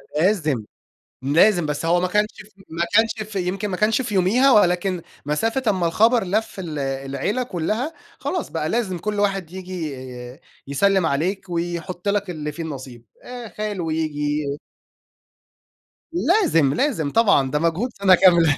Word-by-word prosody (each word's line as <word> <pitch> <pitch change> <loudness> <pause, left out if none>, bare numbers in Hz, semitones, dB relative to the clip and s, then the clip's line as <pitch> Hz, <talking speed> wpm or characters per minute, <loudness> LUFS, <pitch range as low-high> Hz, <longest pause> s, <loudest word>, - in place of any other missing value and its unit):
ده 155 - +1
لازم، 155 - +1 0.6
لازم، 170 +6 +4
بس 150 +2 -3
هو 175 +1 +3
ما 180 - 0
كانش 210 +3 +2 0.4
ما 170 +1 -1
كانش 220 -1 +2
في 195 - -1
يمكن 195 +3 -2
ما 185 - -2
كانش 215 +5 +2
في 225 -5 -4
يوميها، 230 +9 +4
ولكن 180 -3 +3 0.2
مسافة 225 - 0
أمّا 185 -3 0
الخبر 225 +6 +3
لف 205 +3 -2
ال 155 -5 -5
العيلة 135 - -2
كُلّها، 225 - -2 0.3
خلاص 360 - -3
بقى 160 -1 -2
لازم 190 -4 -1
كل 210 +3 -2
واحد 195 -4 0
ييجي 180 -5 -5 0.7
يسلِّم 190 +5 +2
عليك 180 +7 -1
ويحط 175 +2 -3
لّك 200 -1 0
اللي 150 -3 -4
في 165 +2 -6
النصيب 130 -6 -8 0.2
آآ، 245 -2 -7
خالو 205 -7 -4
ييجي. 150 -2 -1 1.6
لازم، 330 - +3
لازم، 165 - 0
طبعًا 195 - +3
ده 150 - +1
مجهود 170 +9 0
سنة 190 -2 +5
كاملة 170 -5 +5
180 Hz, 150 wpm, -22 LUFS, 155-210 Hz, 1.6 s, سنة